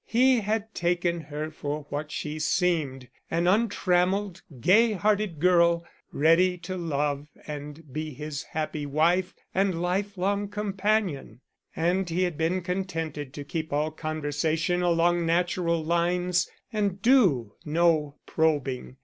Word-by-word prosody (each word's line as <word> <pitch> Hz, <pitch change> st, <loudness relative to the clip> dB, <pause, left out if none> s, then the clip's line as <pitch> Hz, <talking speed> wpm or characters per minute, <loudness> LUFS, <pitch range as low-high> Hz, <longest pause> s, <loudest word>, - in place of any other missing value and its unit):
He 255 Hz, +1 st, +4 dB
had 220 Hz, +1 st, -2 dB
taken 175 Hz, 0 st, 0 dB
her 155 Hz, 0 st, -5 dB
for 150 Hz, -1 st, -4 dB
what 150 Hz, +1 st, -4 dB
she 150 Hz, 0 st, -4 dB
seemed 155 Hz, -6 st, 0 dB, 0.2 s
an 170 Hz, +1 st, 0 dB
untrammeled, 190 Hz, -2 st, +1 dB, 0.2 s
gay 215 Hz, -, +5 dB
hearted 205 Hz, -3 st, 0 dB
girl, 170 Hz, 0 st, +4 dB, 0.3 s
ready 170 Hz, +4 st, +3 dB
to 180 Hz, +2 st, -6 dB
love 145 Hz, -4 st, -1 dB, 0.2 s
and 150 Hz, +1 st, -7 dB
be 155 Hz, +1 st, -3 dB
his 150 Hz, 0 st, -5 dB
happy 155 Hz, -1 st, -4 dB
wife 170 Hz, +6 st, +2 dB, 0.2 s
and 190 Hz, -3 st, +1 dB
lifelong 200 Hz, +2 st, -1 dB
companion; 200 Hz, -, -1 dB, 0.3 s
and 175 Hz, +3 st, +1 dB
he 175 Hz, +3 st, +1 dB
had 175 Hz, -3 st, -1 dB
been 165 Hz, +4 st, 0 dB
contented 165 Hz, -6 st, -3 dB
to 145 Hz, -, -5 dB
keep 160 Hz, +2 st, -4 dB
all 150 Hz, +2 st, 0 dB
conversation 155 Hz, +2 st, -1 dB
along 175 Hz, 0 st, +2 dB
natural 170 Hz, -1 st, +1 dB
lines 175 Hz, +1 st, +1 dB, 0.2 s
and 200 Hz, -2 st, -1 dB
do 180 Hz, -, +4 dB
no 155 Hz, -2 st, +2 dB
probing. 140 Hz, -5 st, -1 dB
170 Hz, 125 wpm, -27 LUFS, 155-185 Hz, 0.3 s, gay